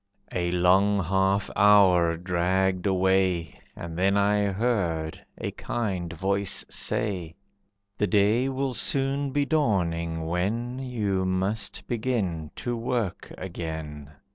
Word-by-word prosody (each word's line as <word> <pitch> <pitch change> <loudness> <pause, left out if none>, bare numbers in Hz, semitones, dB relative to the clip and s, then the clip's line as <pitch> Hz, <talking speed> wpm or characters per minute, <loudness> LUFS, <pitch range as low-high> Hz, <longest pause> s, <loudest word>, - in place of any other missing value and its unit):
A 85 -1 -1
long 95 +3 +3
half 95 +3 +1
hour 95 -5 +5
dragged 90 +2 0
away, 95 -4 +1 0.2
And 85 0 -7
then 100 +2 +3
I 105 0 +2
heard 95 -8 -1
a - - -4
kind 95 -8 -3
voice 100 +3 0
say, 90 -7 -1 0.6
"The 105 - +2
day 105 +7 +3
will 135 0 -2
soon 135 +4 0
be 140 +1 0
dawning, 85 - 0
when 110 +9 -2
You 105 -8 -1
must 95 +4 -2
begin 105 -10 -2
to 120 -1 -3
work 115 -5 -3
again. 80 -5 -6
95 Hz, 115 wpm, -26 LUFS, 85-110 Hz, 0.6 s, hour